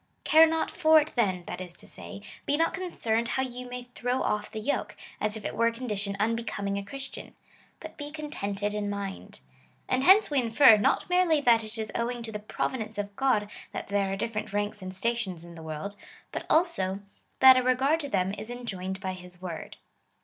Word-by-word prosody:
Care 320 +1 +7
not 320 0 0
for 315 -3 +6
it 305 +1 -2
then, 190 -7 +1
that - - -6
is 175 -2 -8
to - - -13
say, 200 - -9 0.2
be 290 - +2
not 330 +1 +2
concerned 235 -12 -1
how 265 - 0
you 250 -1 -6
may 250 0 -5
throw 245 +1 -2
oif 210 0 -1
the 220 - -5
yoke, 255 +7 -2 0.2
as 215 +1 0
if 215 - -9
it - - -3
were 230 - +3
a - - +2
condition 210 -5 -3
unbe 230 +2 0
coming 200 -1 -2
a - - -6
Christian, 270 +6 -8 0.4
but - - -10
be 290 -1 -5
contented 210 -10 -3
in 210 -1 -2
mind. 200 -1 -6 0.5
And 255 +1 +1
hence 390 +2 +6
we 285 - +3
infer, 230 0 +7
not 205 - +2
merely 360 -4 +3
that 235 -4 +5
it 220 +1 -5
is 220 -1 -3
owing 235 0 -2
to 225 - -5
the 210 - -4
providence 215 0 -3
of 205 0 -4
God 250 -6 +2 0.3
that - - -5
there 200 -1 +1
are - - 0
different 215 -1 -3
ranks 205 0 -2
and 185 0 -5
stations 190 -4 -2
in 170 - -11
the 165 - -10
world, 160 +6 -5 0.4
but - - -5
also, 200 - +2 0.4
that 260 0 +10
a 255 - +4
regard 260 +5 +2
to 285 -3 -5
them 190 -4 0
is 215 - -7
enjoined 190 -6 -5
by 190 -1 -3
his 180 -1 -10
word. 175 -3 -7
225 Hz, 210 wpm, -28 LUFS, 200-260 Hz, 0.5 s, that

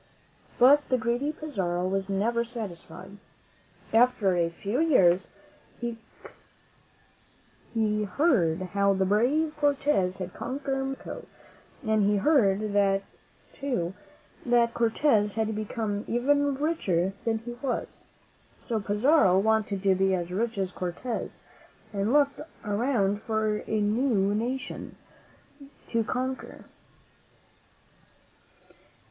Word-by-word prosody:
But 285 +4 +5
the 255 - +3
greedy 240 +5 -1
Pizarro 190 - -2
was 195 +1 -2
never 230 +4 +1
satisfied. 200 -4 -8 0.8
After 225 -5 +4
a 170 -1 +1
few 200 +8 -3
years, 190 - +4 0.5
he 235 -1 -3 2.1
heard 185 - +2
how 200 0 +3
the 190 0 +1
brave 260 +11 +2
Cortez 280 -10 +1
had 185 -1 -6
conquered 270 0 -3
Mexico, 270 0 -6 0.6
and 220 -1 +2
he 205 +1 +3
heard, 200 -5 +2 0.5
too, 245 -12 -2 0.5
that 235 -1 +3
Cortez 225 -3 +2
had 220 -1 -1
become 210 -1 -3
even 285 +4 +2
richer 195 - 0
than 225 -1 0
he 235 +2 -7
was. 265 -3 -4 0.6
So 230 -3 -1
Pizarro 210 - +3
wanted 210 -1 +1
to 195 -1 +4
be 190 0 +2
as 175 -1 -4
rich 225 +4 -1
as 190 -2 -1
Cortez, 185 +7 -5 0.5
and 200 0 -1
he - - +1
looked 285 0 +3 0.3
around 205 -2 0
for 220 -1 0
a 220 - 0
new 210 -2 +1
nation 245 +5 -4 0.9
to 230 -1 +1
conquer. 260 +3 -4
220 Hz, 105 wpm, -27 LUFS, 195-255 Hz, 2.1 s, But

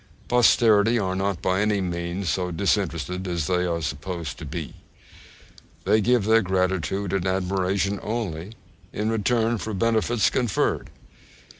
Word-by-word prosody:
Posterity 115 -2 +4
are 95 -4 -1
not 95 -2 -2
by 95 +1 +1
any 105 -1 +1
means 85 +1 -3
so 90 +3 0
disinterested 90 -1 -1
as 85 -3 -1
they 90 +1 +1
are 85 -1 -2
supposed 80 +2 -4
to 80 - -7
be. 80 +1 -6 1.1
They 110 - +3
give 120 -1 +2
their 110 +1 +5
gratitude 95 0 -1
and 95 -1 0
admiration 95 +1 0
only 105 -4 -4 0.4
in 110 +1 -1
return 115 +1 +1
for 110 0 -4
benefits 115 +2 +2
conferred. 120 -8 0
95 Hz, 135 wpm, -24 LUFS, 90-110 Hz, 1.1 s, their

